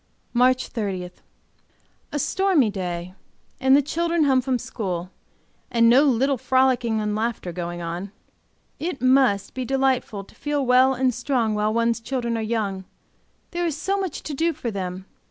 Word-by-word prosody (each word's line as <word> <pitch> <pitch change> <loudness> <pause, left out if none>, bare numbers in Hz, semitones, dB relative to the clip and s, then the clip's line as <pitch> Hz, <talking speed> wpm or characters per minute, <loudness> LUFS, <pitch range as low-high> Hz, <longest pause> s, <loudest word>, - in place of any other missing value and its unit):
MARCH 255 +1 +3
30. 190 -5 -3 1.0
A - - -2
stormy 315 - +2
day 180 -2 -4 0.5
and 265 0 +5
the 285 - +4
children 335 +2 0
home 265 -3 +3
from 255 0 0
school, 185 -6 -4 0.6
and 230 -1 +4
no 255 +5 +6
little 270 0 +2
frolicking 255 -4 +2
and 210 -1 -1
laughing 220 -5 -2
going 175 0 -5
on. 175 +4 -5 0.7
It 330 -3 -3
must, 255 -5 +3
be 260 - -3
delightful 260 -5 0
to - - -19
feel 290 -1 -2
well 255 +1 +5
and 255 0 +1
strong 245 -2 0
while 210 0 +1
one's 230 +1 +1
children 235 -1 -2
are 225 - -1
young, 210 -4 -2 0.7
there 345 0 -1
is 310 -3 -3
so 385 +6 -1
much 375 -6 -4
to 305 - -5
do 330 +4 +1
for 255 -6 -4
them. 185 -1 -5
245 Hz, 160 wpm, -23 LUFS, 210-270 Hz, 1.0 s, no